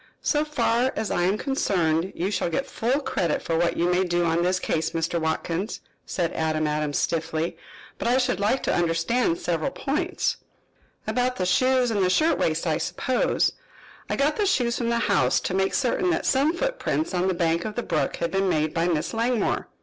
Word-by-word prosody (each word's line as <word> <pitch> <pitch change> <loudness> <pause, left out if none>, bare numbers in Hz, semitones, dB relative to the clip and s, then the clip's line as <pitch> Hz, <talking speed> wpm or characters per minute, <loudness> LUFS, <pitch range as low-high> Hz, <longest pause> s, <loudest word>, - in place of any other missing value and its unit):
"So 295 -1 +2
far 260 -4 +1
as 220 - -2
I - - +1
am 195 +3 +1
concerned 185 - 0
you 185 +4 -1
shall 185 -3 0
get 270 +11 -1
full 265 +2 -1
credit 170 - -1
for 165 - -2
what 170 +1 +1
you 170 - +2
may 180 +1 +2
do 175 -1 0
on 165 +1 +1
this 185 +1 +1
case, 160 -2 -1
Mr. 165 +1 -1
Watkins," 165 +5 -2 0.3
said 170 -3 -1
Adam 155 -1 0
Adams 150 -1 -1
stiffly. 165 0 -1 0.4
"But - - -2
I 245 +2 +3
should 255 -5 +1
like 210 +6 +1
to - - +1
understand 170 +4 +1
several 170 - -1
points." 325 +7 -1 0.7
"About 250 0 0
the 185 - -1
shoes 255 +5 +3
and 205 -3 +1
the 180 - +3
shirtwaist, 185 - +2
I 160 -2 +1
suppose. 255 -1 0 0.6
I - - 0
got 285 +2 +1
the 415 -2 +1
shoes 240 -10 +1
from 235 -1 -1
the 235 - +1
house 205 -3 +2
to - - -3
make 190 0 +1
certain 275 +8 +1
that 345 - 0
some 275 +4 +3
footprints - - -1
on 180 +1 +1
the 190 - +1
bank 170 0 +1
of 215 -1 -5
the 240 - -2
brook 155 - -1
had 170 - -2
been 195 0 +1
made 155 -2 0
by 170 0 +1
Miss 165 +2 -1
Langmore." 230 +1 0
185 Hz, 200 wpm, -25 LUFS, 165-250 Hz, 0.7 s, I